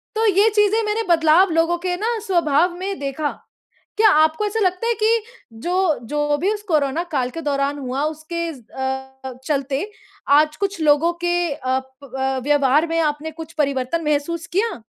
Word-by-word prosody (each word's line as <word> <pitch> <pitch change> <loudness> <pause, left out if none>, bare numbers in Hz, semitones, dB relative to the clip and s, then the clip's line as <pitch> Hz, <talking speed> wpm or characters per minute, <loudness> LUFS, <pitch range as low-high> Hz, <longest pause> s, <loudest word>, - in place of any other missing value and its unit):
तो 445 - +1
यह 415 +1 +4
चीज़ें 420 +2 +3
मैंने 430 +2 -1
बदलाव 330 +3 +5
लोगों 330 +2 +2
के 355 -1 0
ना 455 +3 -1
स्वभाव 345 -1 +2
में 390 -1 -4
देखा। 285 +1 -2 0.7
क्या 430 -1 +6
आपको 315 +7 +1
ऐसा 440 +2 -2
लगता 370 +3 0
है 470 - +2
कि 450 0 +3 0.4
जो 360 -3 +1
जो 295 0 0
भी 385 +7 +1
उस 415 -1 -5
कोरोना 305 0 +1
काल 255 -3 0
के 330 - -6
दौरान 280 0 -1
हुआ 265 +1 -3
उसके 325 +2 -4
ज़ 255 -5 -14
अ, 265 0 -5
चलते 280 +6 -2 0.4
आज 305 +2 +4
कुछ 400 -3 -3
लोगों 305 +3 +3
के 350 -3 +1
अ, 260 -2 -1 0.2
प 265 -3 -14
अ, 265 0 0
व्यवहार 290 +2 +3
में 330 0 -1
आपने 305 0 -1
कुछ 325 +1 -10
परिवर्तन 275 +4 -1
महसूस 300 +3 -1
किया? 420 - 0
315 Hz, 175 wpm, -21 LUFS, 280-370 Hz, 0.7 s, क्या